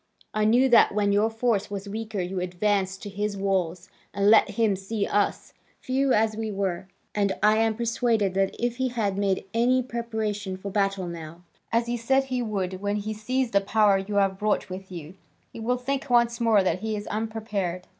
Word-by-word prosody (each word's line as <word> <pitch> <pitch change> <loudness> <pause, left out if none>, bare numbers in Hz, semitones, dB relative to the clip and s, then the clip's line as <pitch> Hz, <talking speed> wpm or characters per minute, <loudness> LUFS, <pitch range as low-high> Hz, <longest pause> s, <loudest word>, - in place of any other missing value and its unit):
I 215 0 +1
knew 245 +5 +4
that 235 -4 +5
when 205 -1 +2
your 205 +2 +3
force 225 -3 0
was 200 0 -5
weaker 215 -1 -4
you 180 +1 -3
advanced 190 +1 -1
to 205 - -5
his 205 +1 -3
walls, 185 -3 -1 0.3
and 200 +1 +4
let 220 - +6
him 210 -1 +1
see 200 +2 -3
us, 205 0 -1 0.3
few 265 +1 0
as 215 -1 +2
we 220 0 -3
were, 195 -3 -2 0.3
and 200 -2 +1
I 215 +1 +5
am 225 0 +2
persuaded 230 -3 0
that 195 0 0
if 240 0 -1
he 260 0 +1
has 225 -5 -1
made 195 -1 0
any 250 +3 +3
preparation 220 -5 -3
for 200 +1 -6
battle 195 -2 0
now, 170 0 -8 0.3
as 230 +1 +2
he 240 0 -2
said 265 +4 +2
he 255 -2 -2
would, 190 -4 -3
when 205 0 -1
he 210 +1 -3
sees 245 +3 -1
the 200 - +3
power 205 -1 +3
you 200 +2 -5
have 195 -1 +2
brought 210 -2 0
with 190 +1 -8
you, 170 -2 -8 0.4
he - - -8
will 245 +3 0
think 270 +2 -3
once 235 0 +3
more 220 -4 +4
that 185 -1 0
he 220 +2 -2
is 205 0 -5
unprepared." 210 -5 -3
210 Hz, 200 wpm, -26 LUFS, 195-230 Hz, 0.4 s, let